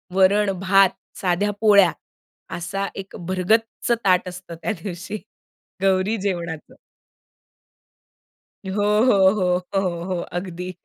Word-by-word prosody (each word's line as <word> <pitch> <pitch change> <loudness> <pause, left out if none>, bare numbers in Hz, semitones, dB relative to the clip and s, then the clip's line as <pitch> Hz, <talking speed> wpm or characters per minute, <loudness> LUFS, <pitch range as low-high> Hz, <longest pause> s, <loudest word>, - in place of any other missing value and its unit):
वरण 195 +1 +4
भात, 195 0 +5 0.3
साध्या 190 +3 +1
पोळ्या 200 -5 +6 0.7
असा 195 +3 -3
1 195 0 -8
भरगच्च 220 +6 0
ताट 185 -1 +3
असतं 180 -1 -9
त्या - - 0
दिवशी 190 +2 -6 0.6
गौरी 195 +3 +2
जेवणाचं. 175 -5 -4 2.0
हो, 205 - 0 0.2
हो, 195 -6 +5
हो, 180 0 0
हो, 170 -3 -3
हो. 180 -2 -2
अगदी. 180 0 -6
190 Hz, 105 wpm, -22 LUFS, 180-200 Hz, 2.0 s, पोळ्या